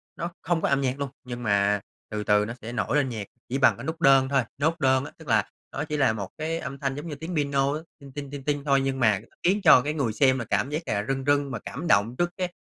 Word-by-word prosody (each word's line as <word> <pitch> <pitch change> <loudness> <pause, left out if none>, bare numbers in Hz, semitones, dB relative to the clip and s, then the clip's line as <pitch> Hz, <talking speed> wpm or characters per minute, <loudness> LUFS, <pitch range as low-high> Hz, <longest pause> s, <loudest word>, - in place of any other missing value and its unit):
nó 170 +1 -4
không 170 -1 0
có - - +1
âm 140 0 +2
nhạc 135 +1 -1
luôn. 140 -2 -2
Nhưng 120 -1 -6
mà 100 -1 +2 0.3
từ 105 -1 -2
từ 105 0 +3
nó 115 - -5
sẽ 115 - -6
nổi 125 +4 0
lên 135 -3 +1
nhạc 110 -4 -5 0.2
chỉ 135 - 0
bằng 140 - +4
cái - - -8
nút 160 +1 -4
đơn 135 -2 +5
thôi 135 -3 +2
nốt 160 +3 0
đơn 130 0 +3
á, - - -9
tức 160 - -14
là 110 -4 +2 0.2
nó 135 - -3
chỉ 150 -1 -3
là 135 -6 +3
một 100 -4 -5
cái 160 +2 -2
âm 135 -1 -6
thanh 135 -1 -2
giống 150 +4 -6
như 150 - -5
tiếng 165 +3 -6
piano 140 -1 +1
á, 155 - -2 0.2
ting, 140 -1 -12
ting, 140 0 -6
ting, 140 -2 -7
ting 145 0 -1
thôi. 135 -1 +3
Nhưng 135 -1 -1
mà 105 -5 +3 0.2
khiến 195 +4 +3
cho 125 - +8
cái 150 +3 -2
người 135 -8 -1
xem 130 +2 +3
là 115 - -4
cảm 100 +7 0
giác 150 +3 -2
là 105 -1 -1
rưng 135 0 -1
rưng 145 -1 +2
và 115 - -3
cảm 160 +6 -5
động 110 0 +3
trước 175 0 +1
cái 180 -1 -2
135 Hz, 290 wpm, -26 LUFS, 120-150 Hz, 0.3 s, cho